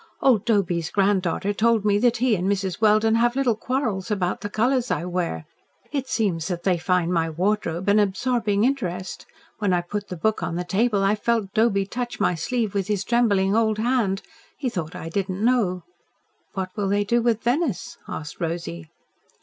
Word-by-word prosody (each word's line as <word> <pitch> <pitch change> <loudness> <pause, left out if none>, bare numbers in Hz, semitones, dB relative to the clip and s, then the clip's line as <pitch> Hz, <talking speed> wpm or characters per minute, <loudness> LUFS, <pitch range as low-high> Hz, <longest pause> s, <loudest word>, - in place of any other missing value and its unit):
"Old 235 -6 +3
Doby's 180 -7 +1
granddaughter 195 -1 +1
told 220 0 +2
me 205 -1 +3
that 240 +1 +3
he 245 -1 +2
and 185 +1 -1
Mrs. 195 -1 -2
Welden 215 +1 +4
have 240 +2 +2
little 260 -4 +2
quarrels 225 -4 -2
about 185 -4 -1
the 205 - -4
colours 245 +3 +1
I 160 - -1
wear. 175 - -2 0.5
It 275 -3 -2
seems 185 -10 0
that 175 -2 -4
they 180 -3 +2
find 180 0 +1
my 165 -1 +1
wardrobe 180 +1 -1
an 205 +1 +5
absorbing 210 +1 +1
interest. 190 -9 -2 0.3
When 205 -4 +1
I 175 - +2
put 205 +4 -5
the 180 - -6
book 220 +6 0
on 165 - -2
the 175 - -2
table, 205 +2 +1
I 195 +1 +3
felt 215 -2 -1
Doby 215 -3 +2
touch 240 +4 -5
my - - +2
sleeve 215 +6 -2
with 195 -2 -1
his 205 -2 0
trembling 205 -4 +2
old 220 -1 +2
hand. 220 -4 0 0.3
He 270 -4 -1
thought 170 -9 -5
I - - -6
did 190 +3 -2
not 190 +3 -3
know." 220 -7 +2 0.7
"What 190 -2 -3
will 200 -2 -1
they 205 +1 +2
do 235 +4 +1
with 230 -2 +1
Venice?" 250 - -1
asked 150 -1 -7
Rosy. 160 - -4
205 Hz, 190 wpm, -24 LUFS, 180-230 Hz, 0.7 s, an